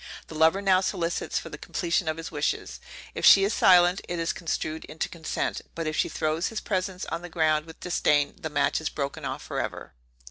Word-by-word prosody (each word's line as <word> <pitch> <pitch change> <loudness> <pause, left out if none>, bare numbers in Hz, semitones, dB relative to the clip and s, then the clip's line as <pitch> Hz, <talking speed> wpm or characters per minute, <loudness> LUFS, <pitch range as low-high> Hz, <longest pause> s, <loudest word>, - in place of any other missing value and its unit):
The - - -8
lover 160 +5 +3
now 190 -1 +4
solicits 175 -3 -1
for - - -4
the - - -9
completion 175 -1 -1
of 155 0 -1
his 165 0 -6
wishes; - - -2 0.3
if - - -6
she 195 - +8
is 200 +3 +1
silent, 180 -1 +5
it 175 - -2
is 165 0 -1
construed 160 -2 -3
into 160 - -4
consent; 160 -2 -3
but 165 - -3
if 155 0 -2
she - - +1
throws 155 +3 -1
his 225 - -4
presents 185 -2 -2
on 165 - -2
the 175 - -8
ground 155 -2 +1
with 160 - -13
disdain 150 -4 +2
the 160 - -4
match 145 0 +1
is 160 - -1
broken 140 -1 -4
off - - -4
forever. - - -4
165 Hz, 210 wpm, -26 LUFS, 155-180 Hz, 0.3 s, she